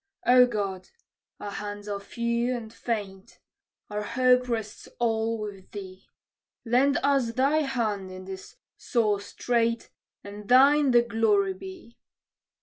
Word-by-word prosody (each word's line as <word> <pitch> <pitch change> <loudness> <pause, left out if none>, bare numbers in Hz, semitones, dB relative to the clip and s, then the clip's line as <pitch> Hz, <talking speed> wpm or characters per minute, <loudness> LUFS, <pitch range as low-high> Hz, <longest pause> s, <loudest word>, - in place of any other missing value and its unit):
"O 250 0 +7
God, 195 -5 -4 0.5
our 205 - -6
hands 205 0 -6
are 200 -1 -3
few 235 +4 -1
and 225 -1 -9
faint; 200 -5 -5 0.5
our 210 0 -4
hope 250 +3 +2
rests 220 -3 -4
all 225 -1 0
with 205 -3 -8
thee: 190 -2 -9 0.6
Lend 260 +4 +3
us 275 -5 +2
thy 275 +5 +2
hand 225 -10 -1
in 185 0 -9
this 190 0 -9 0.2
sore 215 -5 0
strait, 230 +2 -1 0.3
and 205 +1 -10
thine 280 +3 +6
the 240 -1 +5
glory 215 -4 +1
be!" 290 - -12
225 Hz, 130 wpm, -26 LUFS, 205-250 Hz, 0.6 s, O